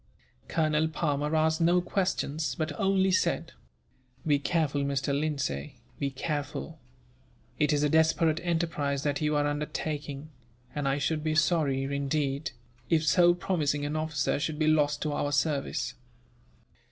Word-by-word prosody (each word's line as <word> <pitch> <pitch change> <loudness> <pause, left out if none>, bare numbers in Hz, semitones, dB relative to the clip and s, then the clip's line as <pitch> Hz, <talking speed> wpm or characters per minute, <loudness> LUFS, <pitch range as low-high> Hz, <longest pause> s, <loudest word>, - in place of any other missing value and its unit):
Colonel 155 -1 +1
Palmer 150 -1 -1
asked 160 +1 +2
no 175 +2 +4
questions, 180 -4 -1
but 155 -2 -2
only 190 -1 +3
said: 185 - +1 0.7
"Be 145 -2 +3
careful, 145 -2 0
Mr. 140 0 -1
Lindsay, 140 - -2 0.2
be 140 - 0
careful; 145 +3 -4 0.8
it 150 -1 +3
is 145 0 +2
a - - +4
desperate 160 +1 +3
enterprise 160 -5 -1
that 145 0 -1
you 150 0 +1
are 145 0 +2
undertaking, 145 0 -3 0.4
and 145 -2 -2
I 135 +1 +1
should 150 +2 -1
be 155 -1 0
sorry, 155 -4 +2
indeed, 140 +1 -1 0.4
if 160 -1 +3
so 175 +2 +5
promising 150 -5 0
an 150 +1 -2
officer 155 -2 0
should 155 0 -2
be 155 - +1
lost 150 -2 +2
to 155 - -1
our 145 0 -1
service." 145 -1 0
150 Hz, 140 wpm, -29 LUFS, 145-160 Hz, 0.8 s, so